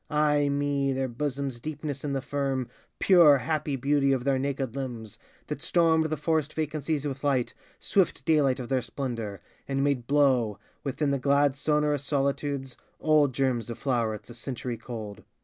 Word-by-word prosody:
Ai 150 Hz, -1 st, +2 dB
me! 140 Hz, -1 st, 0 dB
their 135 Hz, 0 st, -1 dB
bosoms' 135 Hz, 0 st, -3 dB
deepness 150 Hz, 0 st, -5 dB
and 140 Hz, -2 st, -2 dB
the 135 Hz, -, -2 dB
firm, 135 Hz, -3 st, -1 dB, 0.3 s
Pure, 170 Hz, -7 st, +7 dB
happy 150 Hz, 0 st, -1 dB
beauty 140 Hz, +1 st, +2 dB
of 130 Hz, -2 st, +1 dB
their 135 Hz, -1 st, +1 dB
naked 135 Hz, -2 st, -2 dB
limbs, 120 Hz, -6 st, -6 dB, 0.3 s
That -, -, -5 dB
stormed 165 Hz, -2 st, +3 dB
the 155 Hz, 0 st, -1 dB
forest 155 Hz, 0 st, 0 dB
vacancies 155 Hz, -1 st, -2 dB
with 135 Hz, -1 st, -4 dB
light, 135 Hz, -4 st, +1 dB, 0.3 s
Swift 195 Hz, -4 st, +1 dB
daylight 145 Hz, -5 st, +3 dB
of 125 Hz, -, -5 dB
their 130 Hz, +1 st, +1 dB
splendor, 115 Hz, -5 st, -5 dB, 0.3 s
and 135 Hz, 0 st, 0 dB
made 135 Hz, -4 st, 0 dB
blow, 130 Hz, -7 st, +3 dB, 0.3 s
Within 140 Hz, +1 st, -1 dB
the 140 Hz, -, 0 dB
glad 140 Hz, +1 st, +3 dB
sonorous 150 Hz, 0 st, +1 dB
solitudes, 140 Hz, -2 st, -1 dB, 0.2 s
Old 155 Hz, -3 st, +4 dB
germs 125 Hz, -4 st, 0 dB
of 115 Hz, -, -5 dB
flowerets 115 Hz, -4 st, -1 dB
a -, -, -8 dB
century 120 Hz, 0 st, -5 dB
cold. 110 Hz, -3 st, -7 dB
140 Hz, 165 wpm, -27 LUFS, 130-145 Hz, 0.3 s, Pure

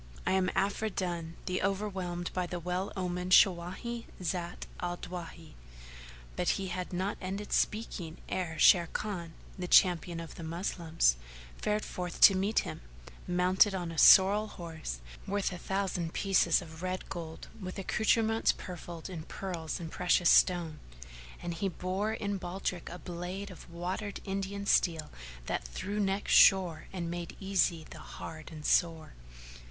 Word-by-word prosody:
I 185 Hz, -, +1 dB
am 190 Hz, -1 st, +2 dB
Afridun 185 Hz, -5 st, -1 dB
the 185 Hz, 0 st, -1 dB
overwhelmed 190 Hz, -3 st, -2 dB
by 180 Hz, -1 st, -1 dB
the 175 Hz, 0 st, -4 dB
well 180 Hz, +3 st, -2 dB
omened 180 Hz, 0 st, -1 dB
Shawáhi,[FN#448] 190 Hz, +7 st, +3 dB, 0.2 s
Zat 175 Hz, 0 st, -3 dB
al 175 Hz, 0 st, -2 dB
Dawahi." 170 Hz, -3 st, -8 dB, 0.8 s
But -, -, 0 dB
he 195 Hz, -1 st, -4 dB
had 180 Hz, 0 st, -4 dB
not 185 Hz, +3 st, -2 dB
ended 195 Hz, +2 st, -4 dB
speaking 185 Hz, -7 st, -1 dB
ere 175 Hz, -3 st, -2 dB
Sharrkan, 170 Hz, 0 st, +3 dB, 0.3 s
the 180 Hz, -, -3 dB
Champion 175 Hz, -2 st, +4 dB
of 165 Hz, -1 st, -8 dB
the 170 Hz, -, -9 dB
Moslems, 165 Hz, -, +1 dB, 0.4 s
fared 210 Hz, 0 st, 0 dB
forth 180 Hz, -1 st, -5 dB
to -, -, +10 dB
meet 200 Hz, +4 st, +2 dB
him, -, -, -7 dB, 0.5 s
mounted 185 Hz, +3 st, +3 dB
on 175 Hz, -3 st, -3 dB
a 160 Hz, -, -3 dB
sorrel 205 Hz, +2 st, +7 dB
horse 160 Hz, -, -7 dB, 0.3 s
worth 200 Hz, 0 st, 0 dB
a 180 Hz, -, -7 dB
thousand 185 Hz, -4 st, -2 dB
pieces 190 Hz, -4 st, +3 dB
of 160 Hz, 0 st, -11 dB
red 185 Hz, 0 st, -3 dB
gold 165 Hz, -3 st, -7 dB
with 185 Hz, -1 st, -6 dB
accoutrements 220 Hz, +3 st, +2 dB
purfled 175 Hz, -2 st, -8 dB
in 180 Hz, -4 st, -6 dB
pearls 170 Hz, 0 st, -5 dB
and 165 Hz, -2 st, -6 dB
precious 180 Hz, -1 st, +3 dB
stone; 170 Hz, -4 st, +3 dB, 0.6 s
and 175 Hz, -, -3 dB
he 195 Hz, +4 st, -1 dB
bore 185 Hz, +4 st, -2 dB
in 205 Hz, -2 st, -2 dB
baldrick 180 Hz, -1 st, -4 dB
a 175 Hz, -, -7 dB
blade 180 Hz, +3 st, -6 dB
of 180 Hz, -, -12 dB
watered 180 Hz, +4 st, -4 dB
Indian 195 Hz, 0 st, -3 dB
steel 165 Hz, -6 st, +2 dB, 0.3 s
that -, -, -2 dB
through 190 Hz, -, -4 dB
necks 195 Hz, 0 st, 0 dB
shore 180 Hz, -5 st, +6 dB
and 170 Hz, -3 st, -4 dB
made 175 Hz, -1 st, -6 dB
easy 180 Hz, -4 st, +1 dB
the -, -, -9 dB
hard 155 Hz, -1 st, -9 dB
and 155 Hz, -2 st, -9 dB
sore. 165 Hz, -2 st, +2 dB
180 Hz, 145 wpm, -31 LUFS, 170-195 Hz, 0.8 s, to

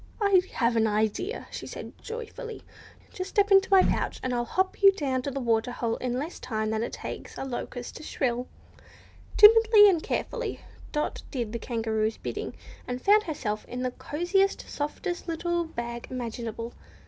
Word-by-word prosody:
"I 400 Hz, -3 st, +5 dB
have 235 Hz, 0 st, +1 dB
an 225 Hz, -1 st, +3 dB
idea," 215 Hz, -, -1 dB
she -, -, -6 dB
said -, -, -8 dB
joyfully. 460 Hz, 0 st, -7 dB, 0.5 s
"Just 370 Hz, +1 st, -4 dB
step 405 Hz, -2 st, +2 dB
into 390 Hz, 0 st, +6 dB
my 385 Hz, -2 st, +7 dB
pouch, -, -, 0 dB
and 255 Hz, -, -1 dB
I'll 240 Hz, 0 st, 0 dB
hop 375 Hz, -, -1 dB
you 395 Hz, -1 st, +9 dB
down 270 Hz, -8 st, -1 dB
to 280 Hz, -, -3 dB
the 275 Hz, 0 st, -3 dB
water 230 Hz, -1 st, +1 dB
hole 235 Hz, -2 st, -2 dB
in 250 Hz, -1 st, -2 dB
less 300 Hz, +6 st, -4 dB
time 215 Hz, -2 st, -2 dB
than 220 Hz, 0 st, 0 dB
it 235 Hz, -, -3 dB
takes -, -, -7 dB
a -, -, -4 dB
locust 245 Hz, -1 st, -5 dB
to -, -, -10 dB
shrill." 250 Hz, -4 st, -1 dB, 0.9 s
Timidly 435 Hz, 0 st, +9 dB
and 350 Hz, -5 st, +3 dB
carefully, -, -, -3 dB, 0.3 s
Dot 300 Hz, -1 st, -2 dB
did 240 Hz, -5 st, -3 dB
the 235 Hz, -, -2 dB
Kangaroo's 220 Hz, -2 st, -1 dB
bidding, -, -, -5 dB, 0.3 s
and 250 Hz, 0 st, -3 dB
found 415 Hz, +8 st, +5 dB
herself 225 Hz, -10 st, -3 dB
in 250 Hz, +1 st, -5 dB
the 255 Hz, -, 0 dB
cosiest, 350 Hz, +9 st, 0 dB
softest 350 Hz, +5 st, -4 dB
little 345 Hz, +1 st, -1 dB
bag 235 Hz, -6 st, -5 dB
imaginable. 230 Hz, -2 st, -5 dB
260 Hz, 170 wpm, -27 LUFS, 235-380 Hz, 0.9 s, you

